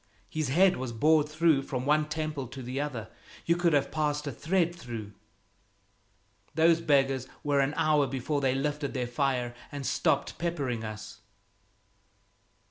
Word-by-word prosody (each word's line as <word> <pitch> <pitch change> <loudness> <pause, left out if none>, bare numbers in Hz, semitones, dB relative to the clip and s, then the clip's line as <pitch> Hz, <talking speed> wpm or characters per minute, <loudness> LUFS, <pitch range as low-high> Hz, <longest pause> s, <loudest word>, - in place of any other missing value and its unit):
"His 155 -4 -2
head 180 +6 +4
was 130 -1 -4
bored 150 +5 +3
through 155 -2 +3
from 130 -2 -4
one 150 +1 +2
temple 150 -4 -3
to 130 +2 -8
the 130 +3 -3
other. 125 -7 -4 0.4
You 170 - +3
could 175 -2 +2
have 145 -2 +2
passed 150 -1 -1
a 145 - -2
thread 170 +6 0
through." 115 -9 -7 1.4
"Those 165 +1 +4
beggars 135 -4 +2 0.2
were 145 -1 +2
an 140 +2 +1
hour 150 -2 +3
before 135 +3 -2
they 130 -1 +2
lifted 145 +1 -2
their 125 -1 0
fire 125 -1 -1 0.2
and 145 -2 -5
stopped 140 - 0
peppering 140 -9 -2
us." 110 0 -7
145 Hz, 150 wpm, -29 LUFS, 130-155 Hz, 1.4 s, head